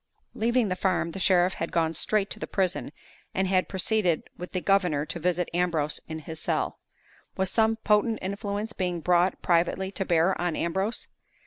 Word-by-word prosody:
Leaving 235 0 +1
the 185 - -1
farm, 185 -3 0
the 195 - -6
sheriff 185 0 +4
had 165 - -4
gone 165 -1 +1
straight 200 +5 0
to - - -1
the - - -4
prison, 185 -6 -1 0.4
and 190 0 +1
had 185 -1 +1
proceeded 190 -3 +1
with 180 - -8
the 185 - -1
governor 180 -7 +2
to 170 - -5
visit 180 +1 0
Ambrose 165 -4 +1
in 160 - -5
his 160 +1 -7
cell. - - -1 0.6
Was 190 0 +1
some 225 0 +3
potent 220 +1 +2
influence 200 +3 -3
being 180 -4 -2
brought 180 +2 +2
privately 180 +2 +1
to 195 - -2
bear 170 +1 +3
on 175 -2 0
Ambrose? 190 +6 -1
185 Hz, 180 wpm, -27 LUFS, 170-200 Hz, 0.6 s, sheriff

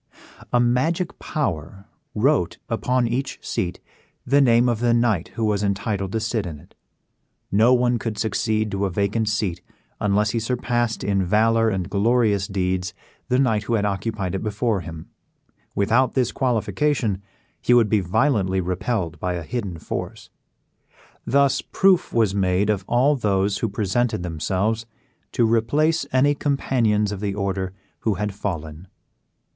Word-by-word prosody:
A 120 - +3
magic 145 +9 0
power 100 - -3 0.3
wrote - - +2
upon 125 -1 +1
each 130 +4 -2
seat 90 - -2 0.5
the 140 +3 +4
name 120 -2 +4
of 120 -3 0
the 120 0 +2
knight 110 -8 +1
who 115 - 0
was 105 -2 +1
entitled 100 -1 -1
to 110 - +1
sit 110 -3 -2
in 80 -3 -6
it. - - -19 0.8
No 110 +5 +5
one 120 -1 +2
could 110 -1 -4
succeed 110 0 0
to 100 0 -1
a - - -3
vacant 100 +4 0
seat 105 -5 -1 0.4
unless 105 +1 +1
he 115 - 0
surpassed 120 -1 -1
in 100 -1 +1
valor 115 +4 +3
and 95 -4 -2
glorious 105 -1 +2
deeds 90 -1 -2 0.3
the 125 - +3
knight 110 -6 +2
who 115 - +1
had 105 -2 +1
occupied 100 -1 -2
it 95 - -2
before 110 -1 -1
him; 80 -2 -8 0.7
without 115 +6 +2
this 125 -3 +1
qualification 125 -3 0 0.4
he - - +1
would 115 -3 +5
be 105 0 +2
violently 95 - +1
repelled 90 -1 -2
by 90 +2 -1
a 85 - -4
hidden 100 -2 -4
force. - - -6 1.0
Thus 140 0 +3
proof 190 -2 +2
was 110 -4 +2
made 95 +1 +2
of 100 -3 -2
all 130 +5 +3
those 100 -4 0
who 115 - -1
presented 105 +1 -1
themselves 95 +7 -1 0.5
to 120 - +3
replace 145 +9 +2
any 135 +3 +4
companions 120 -8 +1
of 100 - -4
the 100 -1 -2
order 95 -2 -2 0.3
who 110 -3 0
had 105 +2 -2
fallen. 85 -4 -5
110 Hz, 150 wpm, -23 LUFS, 95-120 Hz, 1.0 s, No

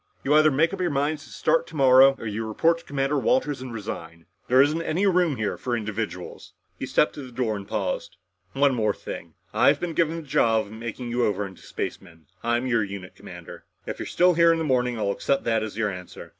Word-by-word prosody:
You 140 - +2
either 155 0 +6
make 160 +5 +2
up 195 - -4
your 180 - +1
minds 145 +1 -1
to - - -16
start - - +1
tomorrow 135 -2 +6
or - - -9
you 110 +1 -3
report 165 +10 +2
to - - -17
Commander 140 +1 -1
Walters 150 - +1
and 130 -1 -7
resign. 85 -7 -7 0.2
There 130 +1 +4
isn't 150 +4 +4
any 165 +4 0
room 180 -6 +3
here 110 -3 -3
for 120 -1 -1
individuals." 110 -4 -5 0.3
He - - -4
stepped - - +2
to - - -8
the 130 -2 -10
door 115 -3 -1
and 100 -1 -7
paused. 100 -6 -3 0.4
"One 140 0 +3
more 110 -4 0
thing. - - -8 0.2
I've - - +4
been 175 -2 -3
given 165 0 +1
the 165 - -6
job 115 -4 +2
of 100 - -14
making 115 +2 -6
you 120 +1 +1
over 105 -2 0
into 95 -1 -11
spacemen. 80 -2 -7 0.2
I'm 120 +2 0
your 115 -4 +2
unit 100 -2 -7
commander. - - -11 0.2
If - - -6
you're - - -4
still 180 +1 +3
here 170 0 +5
in 165 - +2
the 165 - -1
morning, 125 -4 +1
I'll 100 -2 0
accept 135 +7 0
that 115 -1 +1
as 110 -1 -5
your 105 -2 0
answer. 90 -1 -9
125 Hz, 225 wpm, -25 LUFS, 110-150 Hz, 0.4 s, either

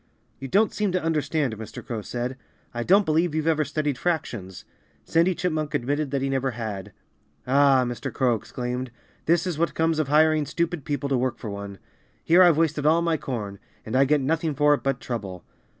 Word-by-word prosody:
"You 135 - -6
don't 205 - +2
seem 210 -2 0
to 185 - 0
understand," 155 -5 0
Mr. 110 0 -9
Crow 115 -3 -4
said. 120 +4 -4 0.4
"I 120 - -3
don't 195 - +4
believe 160 +1 +1
you've 155 -1 -1
ever 160 -2 +2
studied 150 -2 -2
fractions." 120 - -3 0.4
Sandy 170 +3 +2
Chipmunk 155 -4 -2
admitted 145 +2 -1
that 135 -1 -1
he - - 0
never 135 0 0
had. 105 -5 -5 0.5
"Ah!" 135 0 +4
Mr. 120 -1 -4
Crow 125 -3 +2
exclaimed. 125 +3 -4 0.4
"This 170 +2 +3
is 175 -4 -3
what 170 - 0
comes 160 -1 +1
of 155 - 0
hiring 155 0 +3
stupid 170 -3 -2
people 145 -1 -2
to 135 - +2
work 130 0 -1
for 110 - -6
one. 100 0 -7 0.5
Here 175 +3 +5
I've 175 -4 +6
wasted 155 -2 +1
all 165 +2 +4
my 165 -1 +1
corn. 105 -8 -5 0.3
And 110 - -4
I 135 +1 +5
get 150 +1 +2
nothing 160 +2 0
for 150 0 +4
it 145 - -1
but 135 -1 -1
trouble." 100 -7 -5
145 Hz, 195 wpm, -25 LUFS, 125-160 Hz, 0.5 s, I've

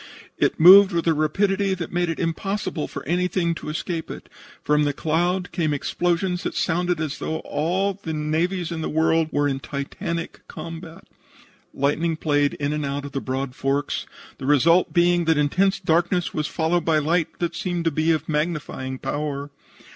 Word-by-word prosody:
It - - +1
moved 190 +3 +9
with 170 -1 0
a 165 - +4
rapidity 195 +6 +1
that 170 -3 -6
made 175 0 0
it 165 - -2
impossible 175 0 -2
for - - -8
anything 175 0 0
to 165 - -7
escape 160 +1 -4
it. - - -9 0.3
From 150 0 +3
the 145 -1 +1
cloud 175 +5 0
came 160 -4 0
explosions 175 +4 -1
that - - -4
sounded 175 0 0
as 155 -3 -3
though 160 - -2
all 180 +6 0
of 195 +1 -13
the 160 - -4
navies 160 +3 -1
of 165 -1 -3
the - - -2
world 160 +1 +2
were 145 0 +1
in 135 -1 -1
titanic 165 +5 -5
combat. 165 +1 -9 0.6
Lightning 155 +4 0
played 145 -2 +1
in 145 +1 -2
and 150 0 -2
out 140 0 -3
in 140 -1 -5
broad 130 0 -3
forks, 135 +2 -1 0.3
the 130 - -5
result 165 +5 +4
being 175 0 +3
that 160 -1 +3
intense 185 +7 +2
darkness 175 +1 +1
was 155 0 -1
followed 170 +1 0
by 160 -1 +2
light 160 +3 0
that 170 -1 -2
seemed 175 -4 -2
to 165 - +3
be 155 +3 +1
of 155 -1 -1
magnifying 150 -4 -2
power. 145 0 -4
165 Hz, 175 wpm, -23 LUFS, 150-175 Hz, 0.6 s, moved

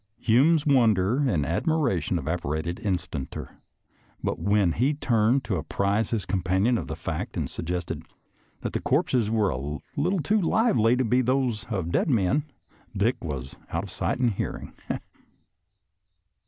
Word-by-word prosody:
Hume's 140 +8 +4
wonder 115 -6 +4
and 80 -9 +1
admiration 100 - +1
evaporated 80 +1 -2
instanter, 85 -8 -4 0.6
but - - -1
when 100 0 +3
he 130 - +1
turned 120 -1 +2
to 95 - -1
apprise 100 +7 0
his 110 -6 -1
companion 95 +5 +1
of 75 - -6
the 80 - -4
fact 80 -1 -4
and - - -1
suggest 90 +1 -4 0.7
that - - -3
the - - -1
corpses 115 -5 +1
were 110 -4 +2
a 65 -2 -3 0.3
little 180 +6 +1
too 210 +7 +2
lively 165 - +3
to 130 0 +1
be 125 +3 +3
those 125 -3 0
of 95 -7 -3
dead - - +1
men, 120 +4 +2 0.5
Dick 110 +6 +1
was 70 -5 -5
out - - -2
of - - -8
sight - - -1
and 125 -2 +2
hearing. 100 - -4
105 Hz, 145 wpm, -26 LUFS, 90-125 Hz, 0.7 s, Hume's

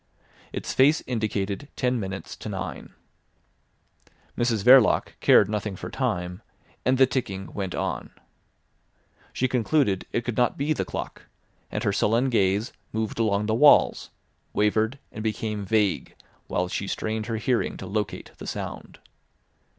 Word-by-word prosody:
Its - - -4
face 140 +4 +4
indicated 105 0 -2
ten 125 -1 0
minutes 95 -1 -5
to - - -7
nine. - - -6 1.4
Mrs 115 -4 0
Verloc 125 -2 +6
cared 100 - +6
nothing 105 -1 -3
for - - -7
time, 90 +2 -2 0.4
and 130 +1 +2
the 135 - +7
ticking 110 -7 -4
went 95 -3 -3
on. - - -3 1.2
She 130 - 0
concluded 125 -4 +1
it 120 - -1
could 120 - -2
not 125 - +2
be 145 +3 +1
the - - -2
clock, - - -6 0.4
and - - -2
her 100 - +1
sullen 115 +6 +2
gaze 100 0 +1 0.2
moved 110 0 -3
along 105 -2 +1
the 110 - 0
walls, 145 +6 +5 0.4
wavered, 110 +4 +1
and 110 - -6
became 105 -2 -2
vague, 105 -3 +1 0.3
while 90 0 0
she 95 +2 -3
strained 110 +2 -3
her 115 -2 -2
hearing 120 +3 0
to - - -7
locate 100 0 -3
the - - -8
sound. - - -6
110 Hz, 145 wpm, -25 LUFS, 100-125 Hz, 1.4 s, the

